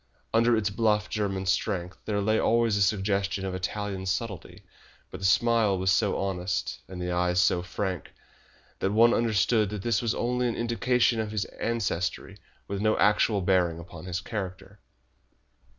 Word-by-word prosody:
Under 115 +1 +4
its 105 -2 0
bluff 105 0 +1
German 95 -3 -2
strength 95 -1 -1
there 100 -2 -1
lay 110 +2 +2
always 115 -2 +2
a 100 - 0
suggestion 100 -1 0
of 95 - -3
Italian 95 +1 -4
subtlety, 100 -1 -4 0.5
but - - -7
the 95 - -4
smile 115 -1 +3
was 95 +1 +1
so 105 +1 +2
honest, 90 -2 -2
and 95 -1 -8
the 90 0 -3
eyes 90 0 +1
so 90 0 +3
frank, 90 -2 -4 0.7
that 95 - 0
one 115 +3 +5
understood 110 -1 +2
that 105 -2 -5
this 115 -4 +1
was 115 -2 0
only 125 +1 0
an 115 - -2
indication 120 0 +1
of 110 -1 -2
his 105 -2 -2
ancestry, 115 -6 -2 0.3
with 100 0 -3
no 110 0 +2
actual 105 0 +3
bearing 90 -3 +2
upon 85 0 -10
his 90 0 -3
character. 100 -1 -6
100 Hz, 165 wpm, -27 LUFS, 95-110 Hz, 0.7 s, one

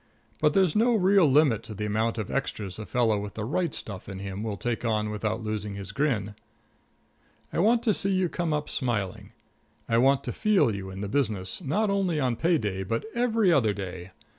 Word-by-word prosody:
But 150 0 +2
there's 185 -5 +3
no 230 +2 +4
real 195 -3 +5
limit 135 -6 +4
to 110 - -9
the 105 +1 -3
amount 110 +2 0
of 110 -3 -4
extras 105 -8 -3
a 110 - -6
fellow 115 -4 +2
with 100 0 -6
the 105 - -3
right 165 +6 0
stuff 100 -6 -7
in 95 - -6
him 95 +1 -5
will 110 -2 -3
take 120 +4 -3
on 110 -2 0
without 110 +2 -2
losing 105 -1 -3
his 100 -1 -6
grin. 110 -5 -1 1.2
I - - 0
want 230 +5 +3
to 220 -3 +3
see 195 - 0
you 185 -1 +2
come 170 -1 -2
up 150 0 -1
smiling; 110 -8 -2 0.6
I 115 0 +3
want 135 +2 +4
to - - -3
feel 205 - +2
you 95 -1 -6
in 95 +1 -7
the 100 - -3
business, 105 - -1
not 200 +9 +1
only 190 -5 +1
on 125 -4 +1
pay 165 +8 +2
day 100 -7 -3
but 115 - -2
every 230 -6 +2
other 110 -8 +3
day. 95 -2 -6
115 Hz, 210 wpm, -27 LUFS, 105-165 Hz, 1.2 s, real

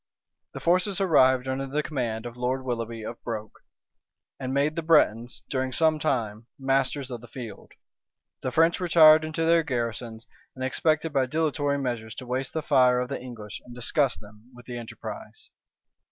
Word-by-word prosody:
The - - -6
forces 180 +3 +2
arrived 130 -8 +4
under 135 +1 -2
the 150 +3 -1
command 120 -6 -3
of 120 -1 -7
Lord 125 +2 -2
Willoughby 115 -2 -4
of 115 +2 -8
Broke; 110 -3 -6 0.8
and 130 0 -4
made 140 +3 +1
the 165 - -1
Bretons, 120 -8 +2
during 130 -1 -2
some 155 +3 +2
time, 115 -7 -2
masters 135 0 0
of 120 -2 -6
the 120 - -12
field. 115 -6 -9 0.7
The 130 - -2
French 165 +5 +3
retired 160 -3 +7
into 160 +1 -2
their 165 0 +5
garrisons; 115 -5 -4 0.3
and 130 - -6
expected 155 +4 0
by 135 -2 +2
dilatory 145 -1 0
measures 120 -5 -3
to 130 - -8
waste 130 +1 -2
the 160 - -2
fire 125 -3 +4
of 125 0 -3
the - - -4
English, 115 -4 -8
and 120 -1 -12
disgust 130 +3 0
them 105 +3 -16
with 125 - -14
the 120 -1 -6
enterprise. 430 - -9
130 Hz, 170 wpm, -26 LUFS, 120-155 Hz, 0.8 s, retired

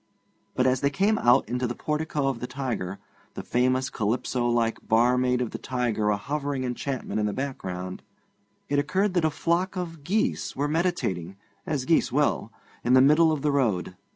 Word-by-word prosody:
But 130 - +2
as 130 -1 +2
they 140 - +3
came 200 +7 +1
out 120 -3 +4
into 125 +2 -1
the 120 - -4
portico 150 -2 -1
of 135 -3 -1
the 125 - -4
Tiger, 125 -8 -3 0.4
the - - -5
famous 130 +1 +1
Calypso 120 +3 -1
like 115 -1 +1
barmaid 125 +2 +3
of 120 - -2
the - - -6
Tiger 120 -5 -1
a 105 - +2
hovering 140 +3 -3
enchantment 130 -1 -3
in 105 - +1
the 105 - -2
background, 95 -9 -5 0.7
it 145 0 +1
occurred 185 +7 +1
that 175 -3 +2
a - - +4
flock 175 +5 -1
of 165 -4 -5
geese 205 +8 -1
were 145 +2 0
meditating, 145 - -1 0.3
as 145 -5 -1
geese 160 -3 +2
will, 140 -4 +1 0.3
in 125 - +2
the - - +8
middle 155 +4 +5
of 150 -2 -2
the 150 - +2
road. 110 -10 0
130 Hz, 180 wpm, -26 LUFS, 120-150 Hz, 0.7 s, the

